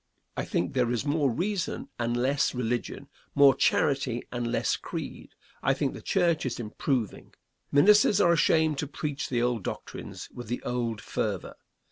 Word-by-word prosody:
I - - -2
think 90 - -1
there 125 -3 +2
is 120 +2 -1
more 145 -1 +2
reason 185 - -2
and 120 0 0
less 135 +2 +1
religion, 120 -1 -3 0.3
more 140 -1 +7
charity 130 -2 +1
and 120 -1 -2
less - - +1
creed. - - -7 0.3
I - - +2
think - - -1
the - - -9
church 170 -3 +1
is 125 -2 -3
improving. 120 0 -3 0.4
Ministers 205 +6 +6
are 170 - +5
ashamed 160 -3 +3
to 150 - -2
preach 145 0 -4
the 120 -2 +1
old 120 -4 0
doctrines - - -6
with 120 -2 -8
the 120 +2 -3
old 120 -3 -2
fervor. - - -3
130 Hz, 160 wpm, -28 LUFS, 120-150 Hz, 0.4 s, more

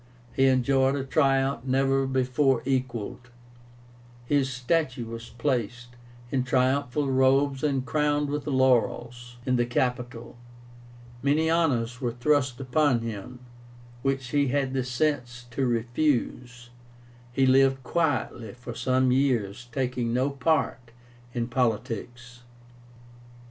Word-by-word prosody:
He 135 - +3
enjoyed 130 +1 +3
a 140 - -2
triumph 135 -2 +1
never 135 +1 +1
before 130 0 +1
equalled. 125 -2 -3 1.0
His 135 0 +1
statue 130 -1 -1
was 115 +1 -8
placed, 120 -2 -2 0.4
in 130 -2 +1
triumphal 135 +1 +1
robes 135 +1 +3
and 135 -3 0
crowned 150 -1 +1
with 145 0 -3
laurels, 120 -2 +1
in 130 -1 +2
the 120 - +2
Capitol. 125 -1 -2 0.8
Many 150 +4 +2
honors 125 -7 +1
were 120 -2 -1
thrust 130 0 +1
upon 135 -1 +2
him, 115 +2 -7 0.6
which 135 -1 -1
he 140 +1 +2
had 135 0 0
the 130 -1 0
sense 125 -2 -2
to 130 +2 0
refuse. 120 0 -1 0.6
He 135 +2 +2
lived 135 0 +4
quietly 130 -10 -1
for 120 0 -8
some 130 +1 +1
years, 120 -5 0
taking 125 -2 -1
no 130 +3 +1
part 135 -3 0 0.5
in 120 -1 -1
politics. 120 0 -3
130 Hz, 115 wpm, -26 LUFS, 120-135 Hz, 1.0 s, lived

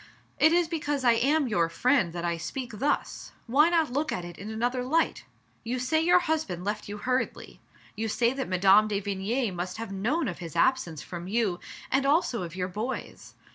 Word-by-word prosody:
"It 315 - +6
is 345 0 +3
because 295 -4 -2
I 240 - +6
am 275 +5 +2
your 170 -7 +1
friend 245 -1 +2
that 175 0 -4
I 170 0 0
speak 235 +6 -6
thus; 290 +3 -2
why 290 +7 +4
not 325 -6 +1
look 300 +3 0
at 180 - -3
it 175 -1 -10
in 200 +3 -7
another 245 +3 -1
light? 320 +6 0 0.4
You 240 +3 -2
say 300 +6 +1
your 355 +2 +5
husband 305 - -2
left 210 +1 -3
you 205 - -5
hurriedly; 255 +4 -2 0.4
you 225 +1 -2
say 235 +3 +1
that 270 0 -4
Mme. 195 +3 +5
de 205 -2 -1
Vigny 205 +4 -1
must 180 +2 -4
have 225 -2 -6
known 245 - 0
of 175 - -5
his 165 -4 -8
absence 260 - +1
from 175 0 -7
you, 205 -4 0 0.3
and 270 +2 +2
also 280 - +2
of 170 -1 -6
your 180 -1 -2
boy's. 215 +8 -6
230 Hz, 200 wpm, -27 LUFS, 190-275 Hz, 0.4 s, It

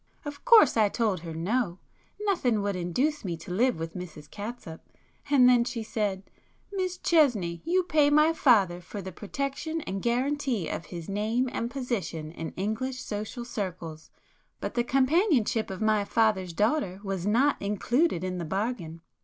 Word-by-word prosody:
Of 290 -1 -7
course 445 - +7
I 215 -2 +4
told 215 -4 0
her 165 -1 -7
no,—nothing 230 - -2
would 200 -1 -1
induce 250 - -1
me 175 -4 -3
to 180 - -10
live 240 +5 +2
with 165 0 -5
Mrs 170 -5 -8
Catsup, 205 -6 -7 0.5
and 265 -3 +6
then 245 -1 +5
she 235 -2 -4
said—'Miss 220 - -4
Chesney, 230 - +2
you 365 +2 +2
pay 305 -4 +3
my 300 +2 +5
father 200 - +3
for 200 +4 -8
the 190 -1 -6
protection 275 - -4
and 195 -7 -4
guarantee 250 - 0
of 165 - -4
his 170 -3 -7
name 220 +6 0
and 235 - -2
position 230 - -3
in 165 -1 -6
English 220 +7 -3
social 215 +2 -5
circles, 175 -8 -5 0.5
but - - -4
the 240 - +1
companionship 270 - +2
of 190 +1 -6
my 215 -1 +3
father's 200 -4 +1
daughter 210 - 0
was 195 -2 -3
not 260 +7 +2
included 210 - +1
in 185 -1 -3
the - - -3
bargain. 180 -2 -3
220 Hz, 155 wpm, -28 LUFS, 185-265 Hz, 0.5 s, course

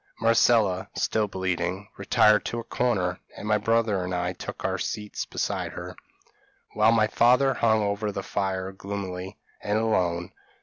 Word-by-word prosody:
Marcella, 115 -4 +3
still 110 -1 +1
bleeding, 95 0 -2
retired 105 -1 +4
to 120 - -3
a - - -5
corner, 95 -9 0 0.2
and 105 - -6
my 105 0 +3
brother 110 -3 +1
and 90 0 -3
I 90 +1 -1
took - - -7
our - - -1
seats 105 -1 -4
beside - - -3
her, - - -7 0.8
while 110 +1 +4
my 110 -2 +4
father 125 +5 +4
hung 110 -3 +2
over 105 +1 -1
the 100 -1 -5
fire 95 -1 -2
gloomily 95 -1 -6 0.2
and 105 +1 0
alone. 90 -6 0
100 Hz, 150 wpm, -26 LUFS, 95-110 Hz, 0.8 s, retired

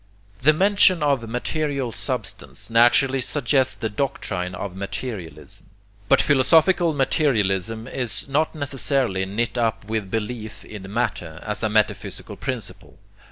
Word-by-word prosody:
The 145 +5 +6
mention 185 0 +4
of 135 -6 +1
material 140 +1 -2
substance 115 - -3
naturally 130 +3 +4
suggests 130 0 +1
the 110 - -3
doctrine 95 -6 -3
of 95 0 -6
'materialism,' 95 - -7 0.4
but - - +5
philosophical 165 +5 +4
materialism 115 - +1
is 125 -3 -4
not 155 +4 0
necessarily 135 -8 0
knit 115 +5 -2
up 115 -3 0
with 110 -2 -3
belief 110 +1 -4
in 100 -2 -9
'matter,' 90 -8 -2
as 105 -1 -4
a 110 - 0
metaphysical 105 0 -1
principle. - - -6
120 Hz, 120 wpm, -23 LUFS, 105-140 Hz, 0.4 s, The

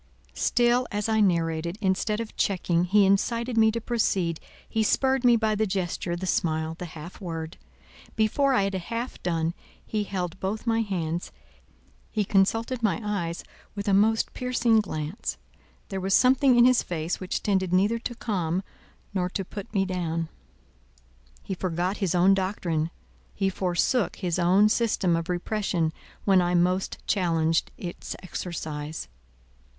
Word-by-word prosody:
Still 245 +1 +2
as 205 0 -1
I 220 -1 +2
narrated, 170 -2 +1
instead 210 +2 0
of 230 -1 -6
checking, 180 -3 +1
he 200 +2 +4
incited 230 +5 +1
me 220 -1 +5
to 230 - -2
proceed 195 -8 0 0.3
he 220 - 0
spurred 265 +4 +2
me 240 -1 +6
by 220 -1 +1
the 215 +1 +1
gesture, 180 -2 -2
the 180 +2 -4
smile, 160 -2 0
the 175 +2 -7
half 170 +6 -10
word. 165 -2 -5 0.6
Before 265 +5 +2
I 200 - +3
had 195 0 -1
half 230 +7 -4
done, 165 -1 0 0.3
he 210 -1 -2
held 180 -3 -4
both 205 +4 -3
my 230 -1 +2
hands, 175 -5 -3 0.8
he 210 -2 -1
consulted 225 +6 +1
my 215 -5 +1
eyes 175 -5 -2 0.3
with 200 0 -5
a 200 - +3
most 220 +3 +3
piercing 245 -3 +2
glance: 160 -1 -4 0.5
there 195 -1 -3
was 195 +1 +2
something 255 0 +5
in 240 - +7
his 255 -1 +5
face 165 0 -3
which 185 -1 -3
tended 190 -3 +1
neither 205 +5 +3
to 240 +1 -5
calm 185 -6 -1 0.5
nor 180 -2 0
to 195 +1 -3
put 200 +1 -8
me 195 -2 +1
down; 165 -3 -2 1.1
he - - -4
forgot 180 +1 -1
his 185 -4 0
own 180 +2 +5
doctrine, 180 -5 -1 0.5
he 195 -1 +1
forsook 185 +6 +1
his 180 -2 -2
own 185 +4 +5
system 215 -6 +2
of 165 +1 -3
repression 175 -3 -1 0.3
when 195 -2 +5
I 175 0 +1
most 180 +2 +1
challenged 165 -4 +1
its 175 -2 -6
exercise. 155 - -5
190 Hz, 155 wpm, -26 LUFS, 175-220 Hz, 1.1 s, in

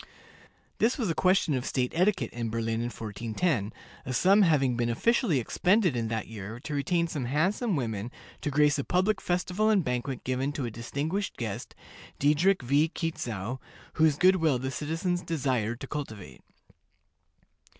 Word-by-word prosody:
This 235 +6 +2
was 220 - 0
a - - 0
question 185 -3 +2
of 130 -2 -1
state 125 -1 -1
etiquette 185 +5 +1
in 115 -1 -3
Berlin 115 0 -1
in 120 - -2
1410, 115 - -2 0.3
a 130 - -5
sum 195 - +5
having 140 -9 +3
been 120 0 0
officially 205 - +2
expended 180 - +2
in 115 -1 -1
that 110 -1 -2
year 110 +1 -7
to 150 - -6
retain 170 +4 +1
some 145 -6 -3
handsome 185 - +1
women 115 -5 -2 0.3
to - - -1
grace 150 0 +3
a - - -1
public 185 +6 +1
festival 180 +4 0
and 205 -4 +3
banquet 125 0 -3
given 130 +3 -1
to 140 -3 -3
a 115 - -4
distinguished 145 - -3
guest, 110 -4 -5 0.4
Diedrich 150 +4 +3
V. 145 +6 +3
Quitzow, 125 - -4 0.3
whose 155 -2 +3
good 185 +2 +5
will 160 -6 +2
the 130 +2 -3
citizens 165 +6 -2
desired 125 -8 -1
to - - -6
cultivate. 110 - -7
145 Hz, 160 wpm, -28 LUFS, 120-180 Hz, 0.4 s, sum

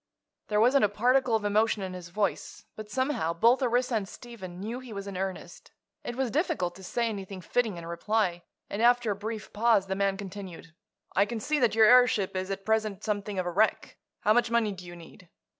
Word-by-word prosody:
There 210 -1 +1
wasn't 250 +4 +4
a 210 - +4
particle 245 +3 +2
of 215 -2 -1
emotion 210 0 +2
in 185 -1 -5
his 180 -1 -8
voice, 200 +3 -3
but 215 -1 -8
somehow 240 - -1
both 235 +9 +4
Orissa 250 0 +1
and 200 -2 -4
Stephen 190 -8 -10
knew 225 +5 -4
he 255 -2 -11
was 200 -1 -6
in 200 -1 -7
earnest. 190 0 -5 0.3
It 240 - -5
was 260 -2 -1
difficult 295 - 0
to 190 - -12
say 235 +5 -1
anything 195 -3 -5
fitting 215 +1 -1
in 170 - -8
reply, 175 +1 -1 0.3
and 205 - -4
after 240 -2 +4
a - - -1
brief 215 +1 -6
pause 220 -2 +3
the 190 0 -3
man 195 0 0
continued: 190 -5 -9 0.4
"I 200 +2 +4
can 235 0 -4
see 295 +7 0
that 240 -4 +2
your 220 -1 +7
airship 235 -5 +5
is 185 +1 -2
at 195 0 -5
present 215 -3 0
something 205 -1 -2
of 185 - -1
a 175 - -2
wreck. 210 +5 +1 0.3
How 215 - +4
much 240 0 +2
money 230 -2 +2
do 180 -2 -9
you 175 - -9
need?" 170 +1 -15
210 Hz, 215 wpm, -28 LUFS, 190-235 Hz, 0.4 s, your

